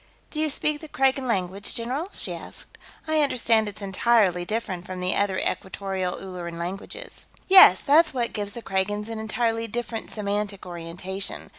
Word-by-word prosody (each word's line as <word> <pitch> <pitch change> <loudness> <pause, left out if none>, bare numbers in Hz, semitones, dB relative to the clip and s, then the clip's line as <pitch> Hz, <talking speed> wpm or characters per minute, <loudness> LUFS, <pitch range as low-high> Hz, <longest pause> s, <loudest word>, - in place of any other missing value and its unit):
"Do 305 - -4
you 310 - +1
speak 295 +1 0
the 315 - -9
Kragan 270 -1 +1
language, 195 -2 -1
general?" 255 +9 -2
she - - -2
asked. - - -10 0.3
"I 315 -1 +3
understand 230 -6 +3
it's 205 0 -9
entirely 195 -3 +2
different 190 -3 -3
from 185 0 -7
the 180 0 0
other 200 -2 +1
Equatorial 190 -1 -2
Ulleran 175 -3 -7
languages." 195 - -4 0.2
"Yes. 375 - +9
That's 315 +3 +5
what 240 -3 -2
gives 205 -1 -3
the 235 - -8
Kragans 205 +3 -1
an 225 -1 -4
entirely 225 +1 -1
different 230 0 -4
semantic 205 -2 -3
orientation. 180 +3 -5
210 Hz, 160 wpm, -25 LUFS, 190-240 Hz, 0.3 s, Yes